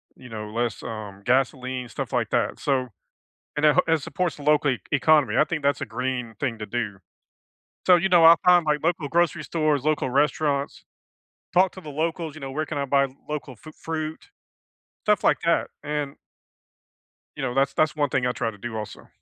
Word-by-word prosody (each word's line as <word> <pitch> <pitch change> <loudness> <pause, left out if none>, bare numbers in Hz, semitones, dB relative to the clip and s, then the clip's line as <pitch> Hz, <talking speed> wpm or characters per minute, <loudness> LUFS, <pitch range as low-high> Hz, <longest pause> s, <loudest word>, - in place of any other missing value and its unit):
you 125 -1 -13
know, 105 -1 -6
less, 120 0 -2
um, 105 -3 -7
gasoline, 130 -1 0
stuff - - -5
like - - 0
that, - - 0
so 130 -3 0 0.7
and 150 - +2
it 150 - +5
he 165 - +3
it 155 - +1
supports 180 +1 -2
local 150 -1 +3
e 125 - -3
economy. 145 -5 +3
I - - +6
think 155 -2 -4
that's 140 0 +1
a - - -1
green 125 -3 -3
thing 120 -6 -2
to 105 - -4
do, 105 -3 -3 0.9
so, 180 -1 +8
you 175 +3 +1
know, 175 -3 +5
I 165 +1 +9
find, 180 -1 +6
like, 150 -1 +1
local 165 -3 0
grocery 170 0 +1
stores, 155 -4 0
local 155 -3 +1
restaurants, 140 +1 0 0.7
talk 185 +1 +4
to 185 - -10
the 155 -4 -9
locals, 160 +1 -2
you 155 - -10
know, 135 - -6
where 155 +3 -2
can 150 - -5
I 140 - 0
buy 140 0 +2 0.2
local 145 -5 -5
fru 155 +7 -13
fruit, 160 - -5 0.8
stuff 210 -1 +2
like - - +4
that, 170 - +2
and 145 -1 -3 1.2
you - - -5
know, 125 -2 -2
that's 135 0 +2
that's 155 +1 +1
one 145 -1 +1
thing 130 -1 0
I 125 - +1
try 115 -2 -2
to 105 - -15
do 110 +2 -6
also. 105 -1 -7
145 Hz, 200 wpm, -24 LUFS, 125-155 Hz, 1.2 s, I